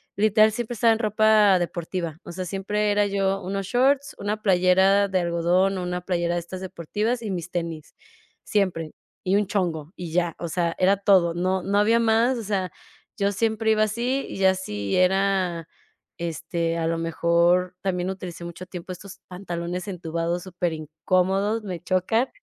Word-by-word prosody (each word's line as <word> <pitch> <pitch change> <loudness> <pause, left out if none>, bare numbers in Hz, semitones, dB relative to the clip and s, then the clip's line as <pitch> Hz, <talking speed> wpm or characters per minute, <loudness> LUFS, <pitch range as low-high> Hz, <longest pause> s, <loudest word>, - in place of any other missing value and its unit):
literal 215 +1 +4
siempre 240 0 -3
estaba 230 0 +4
en 220 - -3
ropa 215 -3 +4
deportiva. 170 -2 -4
O - - -9
sea, 185 +1 -5
siempre 200 +3 -1
era 205 0 +3
yo 195 -1 0
unos 195 +1 -3
shorts, 270 +4 +2
una 210 +1 -3
playera 190 +1 +4
de 190 - +1
algodón 175 +3 +1
o 180 - -3
una 180 0 -3
playera 175 -1 -1
de - - 0
estas 180 +2 -8
deportivas 205 +6 -2
y 220 - -4
mis 180 -2 -4
tenis, 165 -3 -4 0.5
siempre. 185 -6 0 0.3
Y 190 +1 +1
un 205 +1 +3
chongo 170 -6 -2
y 170 -3 -6
ya. 175 -2 +1
O 170 - -4
sea, 170 0 -1
era 190 +2 +4
todo. 185 -4 +4
No 185 +2 0
no 200 +2 0
había 225 +3 +4
más, 230 +3 +3
o 230 - -5
sea, 190 -4 -2 0.5
yo 200 0 +1
siempre 220 +1 +1
iba 215 0 +3
así 240 +5 -1
y - - -6
ya 190 -1 +4
si 105 - -3
era, 185 -2 +1 0.5
este, 170 0 -2
a 165 0 -1
lo 165 - 0
mejor 170 +2 +2
también 180 -1 -1
utilicé 180 -3 -6
mucho 170 +2 -8
tiempo 180 0 -7
estos 195 +2 -11
pantalones 180 0 -5
entubados 170 -1 -3
superincómodos, 185 +5 -1
me 180 -5 -5
chocan, 210 +8 +1
185 Hz, 170 wpm, -24 LUFS, 170-205 Hz, 0.5 s, literal